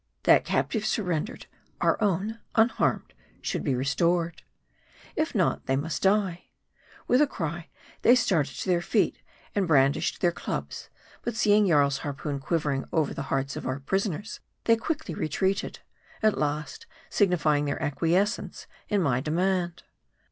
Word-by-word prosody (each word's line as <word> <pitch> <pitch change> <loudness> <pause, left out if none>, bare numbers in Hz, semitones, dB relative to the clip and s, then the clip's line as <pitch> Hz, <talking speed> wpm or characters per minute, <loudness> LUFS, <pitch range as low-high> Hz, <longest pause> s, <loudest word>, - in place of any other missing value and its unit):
That - - +6
captive 220 -3 0
surrendered, 200 -2 -2 0.3
our - - +3
own, 205 +3 0 0.2
unharmed, 225 +1 +2 0.3
should - - -3
be 135 -4 +1
restored. 165 +6 0 0.7
If - - -1
not, - - +1
they 135 - +2
must 155 +4 -2
die. 190 -3 +1 0.6
With 250 +3 +4
a 300 - +5
cry, 165 - -4 0.3
they 240 - +6
started 180 - +1
to - - -5
their 175 -2 +2
feet, - - +1 0.3
and 200 -3 +1
brandished 140 -3 +3
their 175 - +3
clubs; - - -5 0.3
but, 240 - -3
seeing 210 -1 +4
Jarl's 140 -4 +3
harpoon 145 0 -4
quivering 145 -2 -1
over 155 -3 +1
the - - -4
hearts 135 0 -1
of - - -5
our 130 +1 -2
prisoners, 195 +6 -2 0.2
they 230 - +5
quickly 225 - -3
retreated; 190 +6 -1 0.4
at 215 -1 +4
last 155 - -3 0.2
signifying 155 -7 +2
their 145 - -2
acquiescence 170 +8 0 0.2
in 205 -3 +2
my 125 -5 +2
demand. 175 +3 0
170 Hz, 140 wpm, -27 LUFS, 145-205 Hz, 0.7 s, That